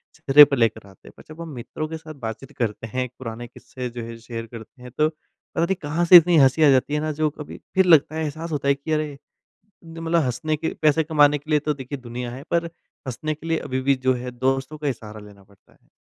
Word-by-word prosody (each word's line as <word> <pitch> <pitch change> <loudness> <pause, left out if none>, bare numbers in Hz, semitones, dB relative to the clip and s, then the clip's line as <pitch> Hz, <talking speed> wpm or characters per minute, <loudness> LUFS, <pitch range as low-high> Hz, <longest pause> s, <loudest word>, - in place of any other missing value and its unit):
चेहरे 145 +2 +8
पे 140 - -1
लेकर 110 -4 0
आते 95 - -19
हैं। - - -13
पर - - -14
जब 155 +2 -10
हम 165 - -7
मित्रों 140 +6 -5
के 160 - -6
साथ 155 -1 -11
बातचीत 110 +4 -6
करते 115 -1 -3
हैं 130 +4 -2
एक 125 - -7
पुराने 120 -1 -7
किस्से 125 +1 -8
जो 120 0 -7
है 115 0 -8
शेयर 115 0 -7
करते 115 +2 -12
हैं 125 - -10
तो 155 0 +3
पता 160 +1 -6
नहीं 190 +2 0
कहाँ 155 +4 -1
से 175 +1 +11
इतनी 170 0 +5
हँसी 135 +3 +5
आ 150 - +7
जाती 135 +2 +2
है 150 - +1
ना 155 +1 -2
जो 155 +1 0
कभी 150 0 -10 0.2
फिर 190 0 +4
लगता 160 -3 +5
है, 160 - -2
एहसास 155 +2 -5
होता 145 -2 -2
है 140 - +5
कि 140 +3 -7
अरे, 150 -2 -1 0.7
न 165 0 -10
मतलब 165 0 +1
हँसने 150 +5 -1
के 160 - -3
पैसे 155 +1 +3
कमाने 150 -2 +4
के 150 +3 -19
लिए 150 - +4
तो 150 +1 -1
देखिए 135 0 -7
दुनिया 120 0 -6
है, 130 +3 -9
पर 170 0 +1 0.4
हँसने 155 +5 -3
के 160 +2 -11
लिए 165 0 +1
अभी 130 0 -3
भी 140 +1 +2
जो 130 0 +1
है 125 0 -6
दोस्तों 135 +4 -2
का 150 - -3
ही 135 - +1
सहारा 110 -1 -11
लेना 100 -1 -17
पड़ता 100 0 -26
है। - - -32
140 Hz, 260 wpm, -23 LUFS, 125-155 Hz, 0.7 s, से